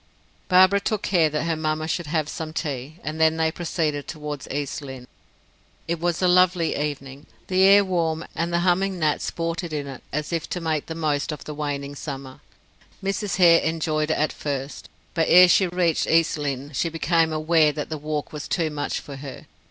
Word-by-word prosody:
Barbara 185 +2 +6
took 205 +1 -2
care 170 -5 +3
that 150 0 -2
her 165 0 0
mamma 155 0 -2
should 170 0 -2
have 155 -1 0
some 155 0 -6
tea 145 -1 -4
and 155 +1 -4
then 160 0 +4
they 160 0 +1
proceeded 155 -4 -2
toward 150 -2 -6
East 145 +1 -3
Lynne. 130 -3 -9 0.8
It 170 0 -2
was 175 +1 -1
a - - +5
lovely 180 -2 +3
evening 140 -1 -5 0.2
the 185 0 +2
air 200 +1 +7
warm, 165 -3 -1
and 170 +1 -2
the 170 0 +1
humming 185 +2 +1
gnats 155 -3 0
sported 165 0 -3
in 145 -2 -2
it 135 -2 -8
as 150 +4 -3
if 165 -2 -2
to 180 - -3
make 160 -3 -2
the 160 - -5
most 155 -2 -1
of 150 - -7
the 150 - -7
waning 145 -1 -4
summer. 135 -2 -7 0.6
Mrs. 195 0 -1
Hare 170 -2 +6
enjoyed 155 -1 -1
it 155 - +2
at 155 - 0
first, 140 -1 -5 0.2
but 165 -2 +1
ere 180 +1 +9
she 185 +1 +4
reached 175 -2 +1
East 165 0 +3
Lynne, 145 -1 -4
she 165 - 0
became 165 0 +1
aware 155 0 +3
that 150 0 -5
the 155 - -3
walk 150 0 -4
was 150 0 -6
too 160 -3 0
much 145 -1 -3
for 140 -2 -9
her. 135 -1 -9
160 Hz, 200 wpm, -24 LUFS, 150-170 Hz, 0.8 s, ere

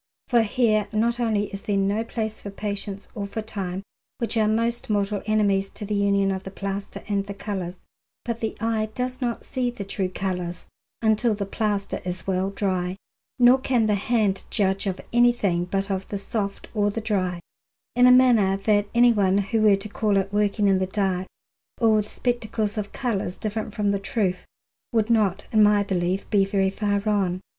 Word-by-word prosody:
For 240 -2 +5
here 215 -1 +2
not 230 +2 +1
only 215 -4 0
is 200 - -5
there 205 -1 -1
no 200 +3 +1
place 220 -1 -4
for 200 - -6
patience 200 0 -5
or 200 -1 -4
for 220 +2 -4
time, 195 -3 -4 0.3
which 235 -1 -1
are 220 -1 +3
most 230 +2 0
mortal 205 -1 0
enemies 200 -2 +2
to 210 - -6
the 210 - -3
union 200 -1 +2
of 190 -1 -2
the 190 - -7
plaster 195 0 -5
and 200 -1 -1
the 200 - -6
colours, 185 -3 -5 0.4
but 235 -1 -3
the 220 -1 -3
eye 220 -1 0
does 255 +1 -3
not 240 -2 -2
see 255 -2 -1
the 240 -5 -6
true 190 -1 -2
colours 180 -2 -4 0.3
until 220 +1 +3
the 200 -1 -3
plaster 205 -1 -2
is 180 -1 -5
well 190 0 0
dry, 185 -2 -1 0.4
nor 250 +2 +6
can 250 -4 +1
the 215 - +2
hand 205 -1 +1
judge 195 -2 0
of 190 -1 -2
anything 240 -8 +3
but 195 +2 -2
of 190 0 -2
the 200 - -2
soft 200 0 -3
or 205 -2 +2
the 205 - -3
dry, 185 -5 -1 0.6
in 245 +1 +6
a - - +8
manner 235 -7 +5
that 205 +1 +2
anyone 215 -6 +4
who 205 +3 0
were 210 -2 +6
to 195 +2 -6
call 210 -1 0
it 195 +1 -1
working 205 0 +2
in 190 -1 +4
the 185 - 0
dark, 190 -2 -1 0.5
or 225 -3 +4
with 210 0 -1
spectacles 220 -4 -2
of 210 -2 -3
colours 205 -7 -2
different 215 0 -3
from 205 -1 0
the 200 - 0
truth, 195 -2 -1 0.4
would 225 -1 +1
not 200 -4 +2
in 215 - +4
my 205 -1 +5
belief 185 0 -1
be 200 -2 +4
very 195 -1 +1
far 205 0 0
wrong. 200 -4 0
205 Hz, 190 wpm, -24 LUFS, 195-220 Hz, 0.6 s, a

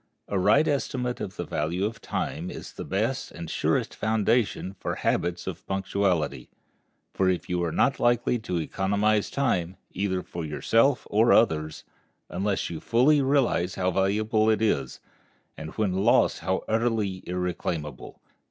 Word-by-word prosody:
A 100 - -1
right 150 +11 +4
estimate 125 -3 -1
of 95 - -5
the - - -3
value 85 +4 -1
of 110 +2 -4
time - - -3
is - - -8
the - - -6
best 110 +7 -1
and 85 -1 -8
surest - - 0
foundation 110 -2 0
for - - -3
habits 85 0 -1
of 95 -1 -6
punctuality, 95 -9 -1 0.6
for 95 -1 +2
you 90 -1 -1
are 85 - -1
not - - +2
likely 120 0 +2
to 90 -5 -3
economize 100 +5 +1
time, 95 -10 -1
either 95 -1 -1
for 85 - -6
yourself 115 - +2
or 110 +3 +4
others, 80 -8 +2 0.5
unless 95 +4 -1
you 80 - -5
fully 135 - +3
realize 130 -10 +1
how 95 -1 0
valuable 110 +4 +2
it 110 - +3
is, 70 - 0 0.6
and 80 - -7
when 105 -4 +1
lost 95 +1 +3
how 95 - -1
utterly 110 -4 0
irreclaimable. 85 -5 -4
95 Hz, 145 wpm, -26 LUFS, 90-110 Hz, 0.6 s, right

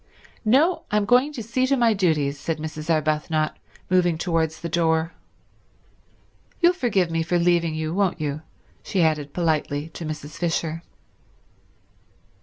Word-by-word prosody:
"No, 280 +11 +3
I'm 210 -1 +1
going 250 +7 +4
to 240 -6 -5
see 255 +4 0
to 275 +1 +2
my 235 -2 +4
duties," 150 -7 0
said 165 +2 -2
Mrs. 155 0 -6
Arbuthnot, 155 0 0 0.3
moving 175 -2 +2
towards 160 -2 -1
the 170 - -3
door. 165 0 +1 1.5
"You'll 350 0 +5
forgive 200 - 0
me 165 0 0
for 175 +2 0
leaving 170 -2 +2
you, 155 0 -3
won't 190 -2 0
you," 150 0 -3 0.4
she 190 -4 0
added 150 -3 0
politely 155 -3 -1
to 165 - -8
Mrs. 155 -1 -6
Fisher. 165 -1 -1
165 Hz, 140 wpm, -23 LUFS, 155-200 Hz, 1.5 s, You'll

